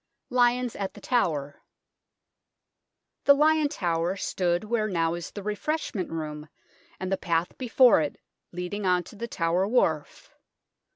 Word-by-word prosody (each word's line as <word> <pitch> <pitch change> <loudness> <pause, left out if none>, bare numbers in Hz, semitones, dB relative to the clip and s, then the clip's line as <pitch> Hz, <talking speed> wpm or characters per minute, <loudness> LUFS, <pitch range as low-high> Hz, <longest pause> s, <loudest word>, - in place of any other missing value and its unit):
LIONS 245 0 +2
AT 195 -1 -4
THE - - -10
TOWER 150 - -1 1.6
The 280 - +8
Lion 305 0 +3
Tower 175 - -1
stood 175 -2 -1
where 215 0 0
now 165 -4 0
is 170 0 -5
the 205 - -8
refreshment 210 - -2
room 150 -2 -5 0.5
and 185 0 -4
the 195 - +2
path 170 0 -1
before 250 -5 +5
it 150 - -4 0.3
leading 180 +4 -4
on 180 -1 +3
to - - -13
the 235 +3 -5
Tower 175 -1 0
Wharf. 160 -10 0
190 Hz, 135 wpm, -27 LUFS, 165-240 Hz, 1.6 s, The